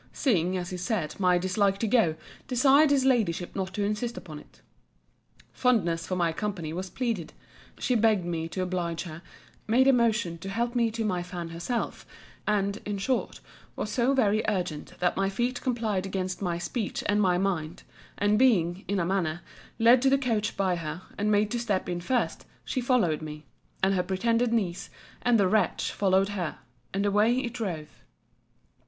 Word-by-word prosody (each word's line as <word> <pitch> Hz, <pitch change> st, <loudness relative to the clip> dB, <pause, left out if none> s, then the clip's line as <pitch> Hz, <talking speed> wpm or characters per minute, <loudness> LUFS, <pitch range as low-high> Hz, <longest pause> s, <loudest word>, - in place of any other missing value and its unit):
seeing, 185 Hz, -, +1 dB
as 180 Hz, 0 st, -4 dB
he 180 Hz, -, -4 dB
said, 180 Hz, -3 st, -2 dB
my 180 Hz, -2 st, +4 dB
dislike 195 Hz, +2 st, +1 dB
to 225 Hz, -, -1 dB
go, 215 Hz, -8 st, +3 dB, 0.3 s
desired 270 Hz, +4 st, +5 dB
his 275 Hz, -2 st, +3 dB
Ladyship 205 Hz, -10 st, +1 dB
not 190 Hz, -1 st, -2 dB
to 205 Hz, -, 0 dB
insist 215 Hz, +4 st, -2 dB
upon 155 Hz, -5 st, -8 dB
it. -, -, -19 dB, 0.9 s
Fondness 175 Hz, -10 st, +1 dB
for 185 Hz, -, -1 dB
my 170 Hz, -2 st, +1 dB
company 175 Hz, -5 st, -3 dB
was 185 Hz, +2 st, -4 dB
pleaded. 225 Hz, -5 st, -3 dB, 0.4 s
She 255 Hz, -, 0 dB
begged 220 Hz, -5 st, +3 dB
me 165 Hz, -2 st, -2 dB
to 185 Hz, +3 st, -3 dB
oblige 175 Hz, -2 st, -2 dB
her: 165 Hz, -2 st, -8 dB, 0.5 s
made 250 Hz, +4 st, +4 dB
a 270 Hz, -, +7 dB
motion 220 Hz, -8 st, +1 dB
to 195 Hz, -, -6 dB
help 235 Hz, +4 st, -1 dB
me 235 Hz, -2 st, +2 dB
to 225 Hz, 0 st, -3 dB
my 180 Hz, -4 st, 0 dB
fan 175 Hz, -1 st, -6 dB
herself: 175 Hz, +9 st, -3 dB, 0.4 s
and, 200 Hz, -1 st, +1 dB
in 205 Hz, -1 st, -3 dB
short, 250 Hz, +6 st, -2 dB, 0.3 s
was 210 Hz, -, -3 dB
so 255 Hz, +4 st, +2 dB
very 215 Hz, -4 st, +3 dB
urgent, 180 Hz, -7 st, -2 dB
that 175 Hz, -, +2 dB
my 195 Hz, 0 st, +1 dB
feet 245 Hz, +5 st, -1 dB
complied 220 Hz, -6 st, -1 dB
against 185 Hz, 0 st, -3 dB
my 175 Hz, -3 st, -1 dB
speech 210 Hz, +5 st, -3 dB
and 205 Hz, +1 st, +2 dB
my 180 Hz, -3 st, +3 dB
mind: 180 Hz, -4 st, -2 dB, 0.3 s
and 205 Hz, +1 st, +2 dB
being, 190 Hz, -8 st, +3 dB
in 200 Hz, 0 st, 0 dB
a 170 Hz, -, +1 dB
manner, 175 Hz, -3 st, -1 dB, 0.4 s
led 235 Hz, +2 st, +6 dB
to 270 Hz, -, +4 dB
the 275 Hz, -, +4 dB
coach 225 Hz, -6 st, -1 dB
by 185 Hz, -3 st, +1 dB
her, 165 Hz, +2 st, -5 dB
and 205 Hz, +1 st, 0 dB
made 210 Hz, 0 st, +2 dB
to 240 Hz, -, -1 dB
step 205 Hz, -5 st, -1 dB
in 175 Hz, -1 st, -3 dB
first, 245 Hz, +7 st, -1 dB, 0.2 s
she 255 Hz, -, -2 dB
followed 230 Hz, -, +2 dB
me: 150 Hz, -1 st, -8 dB, 0.4 s
and 195 Hz, +1 st, +4 dB
her 185 Hz, -, +2 dB
pretended 230 Hz, +6 st, +1 dB
niece, 195 Hz, -7 st, -1 dB, 0.3 s
and 240 Hz, -2 st, +3 dB
the 195 Hz, -, +4 dB
wretch, 215 Hz, +3 st, +1 dB
followed 195 Hz, 0 st, +2 dB
her: 185 Hz, -6 st, -3 dB, 0.3 s
and 200 Hz, +1 st, -1 dB
away 210 Hz, +4 st, +3 dB
it 245 Hz, -3 st, -2 dB
drove. 180 Hz, -11 st, -5 dB
195 Hz, 185 wpm, -27 LUFS, 175-230 Hz, 0.9 s, a